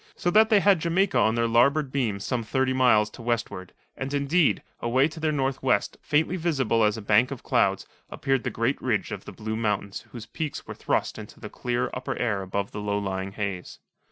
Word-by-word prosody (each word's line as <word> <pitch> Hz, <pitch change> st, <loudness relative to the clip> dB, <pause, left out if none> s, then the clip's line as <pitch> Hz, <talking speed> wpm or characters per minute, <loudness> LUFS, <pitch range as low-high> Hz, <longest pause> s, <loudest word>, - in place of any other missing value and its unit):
so 175 Hz, -, 0 dB
that 220 Hz, +3 st, +5 dB
they 215 Hz, -3 st, +5 dB
had 195 Hz, -3 st, +4 dB
Jamaica 175 Hz, +1 st, +1 dB
on 110 Hz, 0 st, +3 dB
their 115 Hz, 0 st, +1 dB
larboard 135 Hz, +5 st, +3 dB
beam 115 Hz, -8 st, -1 dB
some 120 Hz, +4 st, -2 dB
thirty 130 Hz, +3 st, 0 dB
miles 120 Hz, -5 st, +4 dB
to 120 Hz, -, -11 dB
westward, 115 Hz, -6 st, -3 dB, 0.2 s
and, 135 Hz, +1 st, -5 dB
indeed, 145 Hz, +3 st, +2 dB, 0.2 s
away 130 Hz, +4 st, +2 dB
to 160 Hz, +1 st, -10 dB
the 155 Hz, -1 st, 0 dB
northwest, 135 Hz, -5 st, 0 dB
faintly 160 Hz, +4 st, +1 dB
visible 135 Hz, -10 st, +1 dB
as 105 Hz, +1 st, +2 dB
a 110 Hz, -, -7 dB
bank 110 Hz, +5 st, +4 dB
of 140 Hz, -3 st, -7 dB
clouds, -, -, +1 dB, 0.2 s
appeared 135 Hz, -2 st, -1 dB
the -, -, -1 dB
great 115 Hz, +4 st, -1 dB
ridge 115 Hz, -5 st, -1 dB
of -, -, -6 dB
the -, -, -8 dB
Blue 110 Hz, 0 st, -5 dB
Mountains 105 Hz, -3 st, -2 dB
whose 115 Hz, -3 st, -8 dB
peaks 155 Hz, +6 st, -5 dB
were -, -, -7 dB
thrust -, -, -1 dB
into -, -, -11 dB
the -, -, -8 dB
clear 125 Hz, 0 st, -2 dB
upper 125 Hz, -, -4 dB
air 105 Hz, -5 st, 0 dB
above 100 Hz, +1 st, -3 dB
the 105 Hz, -, -5 dB
low 105 Hz, 0 st, -1 dB
lying 95 Hz, -1 st, -3 dB
haze. 100 Hz, -4 st, -4 dB
120 Hz, 210 wpm, -26 LUFS, 105-140 Hz, 0.2 s, that